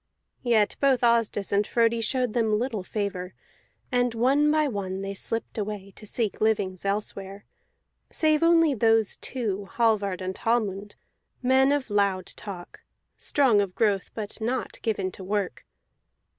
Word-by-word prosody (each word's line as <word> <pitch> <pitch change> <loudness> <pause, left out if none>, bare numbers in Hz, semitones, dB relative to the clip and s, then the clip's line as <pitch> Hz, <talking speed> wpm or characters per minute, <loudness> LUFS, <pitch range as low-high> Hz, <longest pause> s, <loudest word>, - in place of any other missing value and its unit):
Yet 225 -4 +2
both 270 -3 +3
Asdis 230 -4 +2
and 200 +1 +3
Frodi 230 -1 +2
showed 250 0 0
them 220 -3 +2
little 230 -3 -2
favor, 185 -2 -4 0.6
and 245 -2 +1
one 275 +6 +3
by 305 0 +3
one 195 -5 -4
they 195 0 -4
slipped 225 +3 -4
away 200 -2 -5
to 215 - -9
seek 220 -1 -2
livings 200 -4 0
elsewhere, 195 -1 -3 0.6
save 310 -1 +2
only 330 -2 +5
those 225 -3 +2
two, 205 -6 -4
Hallvard 210 -5 +1
and 185 0 -4
Hallmund, 205 -3 -1 0.5
men 265 +2 +4
of 280 -6 -1
loud 200 -2 +1
talk, 185 -4 -9 0.4
strong 255 -8 +3
of 195 -2 -4
growth 205 -4 +1
but 215 0 -5
not 245 +4 -3
given 195 -5 -1
to 190 - -10
work. 195 -6 -3
215 Hz, 145 wpm, -26 LUFS, 200-245 Hz, 0.6 s, only